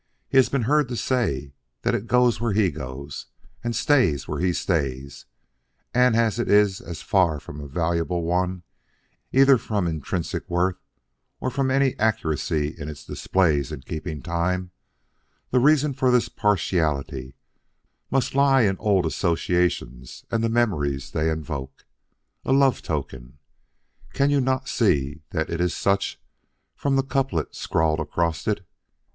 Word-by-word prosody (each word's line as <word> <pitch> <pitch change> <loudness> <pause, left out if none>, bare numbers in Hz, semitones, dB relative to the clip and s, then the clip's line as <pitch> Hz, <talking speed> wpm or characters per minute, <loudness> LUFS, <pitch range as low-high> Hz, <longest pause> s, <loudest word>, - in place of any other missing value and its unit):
He - - 0
has 130 - +6
been 135 -3 0
heard 145 +4 +2
to 120 - -4
say 85 - -1 0.3
that - - +1
it 110 - -2
goes 125 -2 +3
where 115 -3 0
he 100 -3 +3
goes 70 -1 -7 0.4
and 120 -1 -2
stays 115 - +2
where - - -3
he 90 0 +2
stays, 70 -7 -2 0.7
and 125 -2 +4
as 115 -1 +2
it 120 - -1
is 105 -2 +4 0.2
far 85 -6 +2
from 75 +2 -9
a 70 - -7
valuable 85 +3 -1
one 90 +1 -1 0.7
either 135 -1 +6
from 105 -5 -1
intrinsic 85 +1 -3
worth 90 +1 0 0.6
or 130 - -2
from 135 +1 0
any 135 0 +2
accuracy 80 -8 0
it - - -5 0.2
displays 80 -6 +1
in 75 -4 -6
keeping 80 +1 -6
time, 90 +2 -1 0.8
the 125 - +4
reason 150 +2 +4
for 130 -1 +1
this 125 -1 +3
partiality 75 - -1 0.7
must 135 0 0
lie 135 -1 +4
in 95 -3 +1
old 100 -4 +2
associations 85 -7 -1
and 115 0 0
the 115 - +2
memories 75 - 0
they 80 0 0
invoke. 75 -4 -5 0.6
A - - -2
love 135 -2 +4
token. 65 -4 -5 0.8
Can 140 +1 +2
you 140 -1 +3
not 130 0 0
see 70 +3 +1
that 80 0 -2
it 85 +1 -1
is 90 -1 0
such 100 0 0 0.6
from 140 -1 0
the 135 - +2
couplet 135 - -1
scrawled 80 -1 0
across 80 -1 -2
it? - - -1
90 Hz, 145 wpm, -24 LUFS, 75-120 Hz, 0.8 s, has